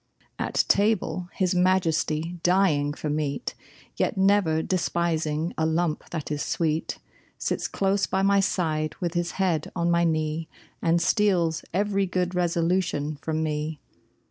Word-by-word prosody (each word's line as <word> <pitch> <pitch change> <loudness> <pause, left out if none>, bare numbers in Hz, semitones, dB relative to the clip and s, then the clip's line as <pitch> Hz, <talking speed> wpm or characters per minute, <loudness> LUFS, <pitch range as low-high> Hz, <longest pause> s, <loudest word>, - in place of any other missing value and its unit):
At - - +1
table, 200 -3 +1
his 185 -2 0
majesty, 175 -2 +1
dying 175 -6 +3
for 155 - -5
meat, 150 -2 -2 0.4
Yet - - 0
never 190 -5 +3
despising 170 -3 -1
a 160 - +2
lump 160 -1 -1
that 155 -3 -5
is 145 -1 -2
sweet, 160 -1 -1 0.4
Sits - - -2
close 195 0 0
by 190 0 0
my 200 0 +4
side 155 -5 0
with 170 -2 -2
his 175 -1 -1
head 175 -5 0
on 170 0 +1
my 170 0 +3
knee 155 -1 0 0.3
And 170 +1 +3
steals 175 -3 +2
every 200 +1 +1
good 180 0 -1
resolution 170 -3 0
from 160 +2 -2
me! 150 0 -2
170 Hz, 140 wpm, -26 LUFS, 155-185 Hz, 0.4 s, my